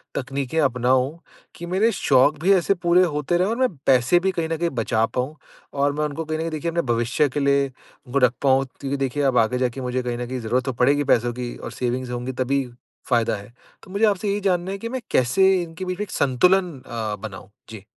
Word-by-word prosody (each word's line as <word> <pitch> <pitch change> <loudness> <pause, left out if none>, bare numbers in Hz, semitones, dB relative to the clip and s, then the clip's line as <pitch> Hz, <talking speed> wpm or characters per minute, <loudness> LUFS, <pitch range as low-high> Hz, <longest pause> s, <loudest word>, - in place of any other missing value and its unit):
तकनीकें 135 +3 -2
अपनाऊँ, 130 +3 +1 0.4
कि 175 - -7
मेरे 195 +6 +2
शौक 145 -5 +3
भी 195 +3 +5
ऐसे 190 +1 +3
पूरे 175 0 +3
होते 150 0 0
रहें 185 +2 +2
और 225 - -1
मैं 260 -1 +2 0.2
पैसे 130 +6 +4
भी 190 +1 0
कहीं 165 -2 -3
न 165 - -1
कहीं 170 +1 0
बचा 115 -3 0
पाऊँ? 130 +6 -3 0.4
और 140 0 +1
मैं 150 +1 -2
उनको 150 +2 -4
कहीं 155 0 -2
न - - -3
कहीं 165 0 -3
देखिए 155 +2 -2
अपने 170 +1 0
भविष्य 120 +5 +1
के 145 - -3
लिए 140 0 +3
उनको 130 +1 -6
रख 125 -1 +4
पाऊँ 135 -1 +3
क्योंकि 140 0 -3
देखिए 135 +1 -1
अब 130 -3 +2
आगे 115 +3 +2
जाके 125 +1 -1
मुझे 125 0 -2
कहीं 120 -1 -3
न 120 0 -4
कहीं 130 0 -4
जरूरत 120 +3 0
तो 130 - -2
पड़ेगी 140 +4 +2
पैसों 120 0 0
की 125 0 -5
और - - -7
सेविंग्स 125 0 -3
होंगी 125 +1 -3
तभी 135 +1 0 0.4
फायदा 115 -2 +2
है। 100 +4 -11 0.3
तो 185 - -14
मुझे 205 +3 +2
आपसे 205 0 0
यही 205 +1 0
जानना 185 -1 0
है 195 - -4
कि 230 +3 -6
मैं 260 0 -4
कैसे 185 +10 +3
इनके 170 +2 -6
बीच 185 0 -3
में - - 0
एक 200 - -9
संतुलन 180 +8 +2
अ, 110 -3 -3
बनाऊँ? 95 -2 -9 0.2
जी। 110 -3 -10
140 Hz, 235 wpm, -23 LUFS, 125-175 Hz, 0.4 s, भी